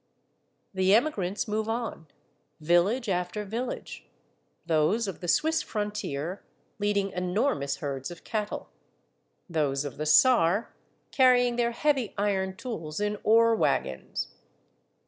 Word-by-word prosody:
The 190 +1 +4
emigrants 210 -7 0
move 215 +1 -1
on, 225 -8 -3 0.5
village 175 +10 +2
after 180 +2 -2
village; 230 +5 -5 0.6
those 165 +8 +2
of 195 - -5
the 175 - -6
Swiss 320 - +2
frontier 205 -6 -4 0.4
leading 200 -1 0
enormous 180 - 0
herds 135 -3 -4
of 175 -1 -11
cattle; 215 -1 -4 0.8
those 145 -4 0
of 140 - -6
the 155 +1 -3
Saar 200 - +4 0.4
carrying 245 -2 +4
their 235 0 +1
heavy 265 -1 0
iron 190 -2 0
tools 165 -9 -5
in 210 0 -1
ore 230 +1 +5
wagons. 65 - -1
205 Hz, 115 wpm, -28 LUFS, 170-230 Hz, 0.8 s, ore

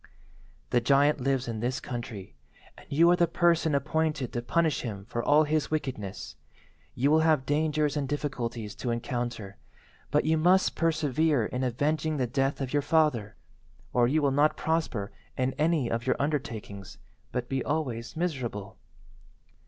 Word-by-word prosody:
"The 120 - +3
giant 140 +3 +3
lives 135 -1 0
in 115 -2 -3
this 125 +3 -1
country, 115 - -7 0.4
and - - -16
you 165 +5 +5
are - - +5
the 175 -1 +3
person 165 -2 +2
appointed 150 -2 -1
to 120 - -2
punish 160 +4 +1
him 100 -5 -6
for 120 +2 -3
all 150 +1 +5
his 155 0 0
wickedness. 105 - -4 0.6
You 135 +4 +2
will 160 - +5
have 155 -4 +3
dangers 150 +1 +1
and 140 -3 -2
difficulties 120 -7 -3
to 125 - -3
encounter, 120 -3 -3 0.5
but 150 - +2
you 160 0 +2
must 185 +4 +4
persevere 155 -5 +1
in 125 +3 -3
avenging 150 +5 0
the 130 - +1
death 135 +3 -1
of 130 0 -3
your 145 - +3
father, 140 -9 +1 0.6
or 120 -1 +4
you 150 +4 +1
will 140 - +3
not 145 +3 +3
prosper 155 -11 -1 0.3
in 130 0 0
any 155 -4 +2
of 115 +2 -3
your - - +3
undertakings, 115 -9 -4 0.3
but 125 -1 -3
be 135 0 -1
always 130 -5 -3
miserable. 125 - -3
140 Hz, 160 wpm, -28 LUFS, 120-155 Hz, 0.6 s, you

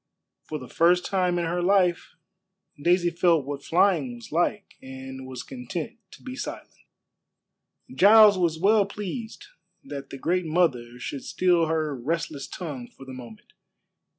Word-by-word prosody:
For 155 - -5
the 130 -3 -10
first 175 +5 +3
time 180 -2 +1
in 170 - 0
her 175 +2 -1
life 180 -2 +2 0.7
Daisy 175 +2 +3
felt 170 -4 +2
what 140 0 -5
flying 170 -8 +2
was 120 - -12
like, 175 +5 -1
and 130 0 -9
was 130 -1 -7
content 160 - -6
to - - -15
be 255 0 -7
silent. - - -7 1.2
Giles 210 0 +7
was 170 -3 0
well 200 +3 +3
pleased 210 +3 -6 0.4
that 140 - -8
the 135 - -7
Great 175 +5 0
Mother 135 -8 0
should 135 +2 -6
still 175 -3 +2
her 155 -2 -1
restless 145 +2 -3
tongue 145 -9 -6
for 135 - -15
the 130 - -9
moment. 120 -4 -12
165 Hz, 150 wpm, -25 LUFS, 135-185 Hz, 1.2 s, Giles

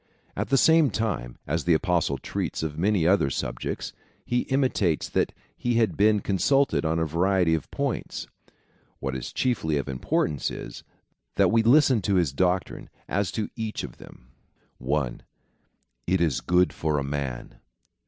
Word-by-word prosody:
At - - -3
the 135 - +4
same 160 0 +5
time, 100 - -3
as 80 +2 -2
the 85 -2 +4
Apostle 85 -5 +1
treats - - -4
of 75 -2 -3
many 95 +1 +1
other 90 -6 +3
subjects, - - -4 0.3
he 120 - +1
intimates 130 - +1
that - - 0 0.2
he 120 -1 -1
had 115 -1 +2
been 105 0 +3
consulted 135 +9 +2
on 80 0 0
a 80 - +1
variety 90 +2 +2
of 80 - -2
points. - - -3 0.7
What 65 -1 -3
is 65 - -5
chiefly 95 - 0
of 70 - -3
importance 70 +2 -1
is, - - -8 0.5
that - - +4
we 115 - +4
listen 130 0 +5
to 100 +1 0
his 85 -7 +2
doctrine 90 +3 -1 0.2
as 100 0 -1
to 110 -2 -3
each 110 -2 -4
of - - -8
them. 65 - -15 0.5
1. 65 -1 -1 0.9
It 95 +1 +2
is 80 -6 +1
good 90 +1 +2
for 75 -1 -1
a 70 - 0
man. 70 -3 -5
90 Hz, 160 wpm, -26 LUFS, 75-110 Hz, 0.9 s, same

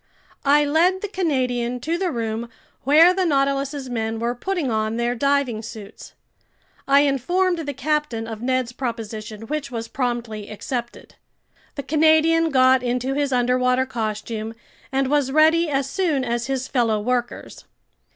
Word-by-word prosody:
I 290 +1 +5
led 345 +6 +2
the 415 - -3
Canadian 255 -10 -1
to 325 +5 -1
the 365 +1 -1
room 230 -3 -3 0.4
where 320 +6 +6
the 380 0 0
Nautilus's 275 -2 0
men 225 -2 -2
were 235 +2 -1
putting 320 +1 -2
on 220 +1 -1
their 240 0 0
diving 275 -3 0
suits. 220 -2 -10 0.7
I 280 +1 +6
informed 345 +6 +1
the 290 -3 -4
captain 280 -4 -1
of 225 -1 -7
Ned's 255 -1 0
proposition, 225 -3 -5
which 300 +4 -4
was 230 -3 -5
promptly 235 -5 -3
accepted. 240 +3 -6 0.6
The 280 - -4
Canadian 315 +2 +3
got 260 -2 +4
into 250 +2 -1
his 285 0 -1
underwater 250 +1 +2
costume 220 -1 -4 0.4
and 270 0 +1
was 285 -1 +1
ready 315 +3 +4
as 275 -1 0
soon 305 -3 0
as 235 0 -2
his 265 -1 -2
fellow 230 -5 +1
workers. 245 +2 -3
260 Hz, 145 wpm, -22 LUFS, 235-295 Hz, 0.7 s, where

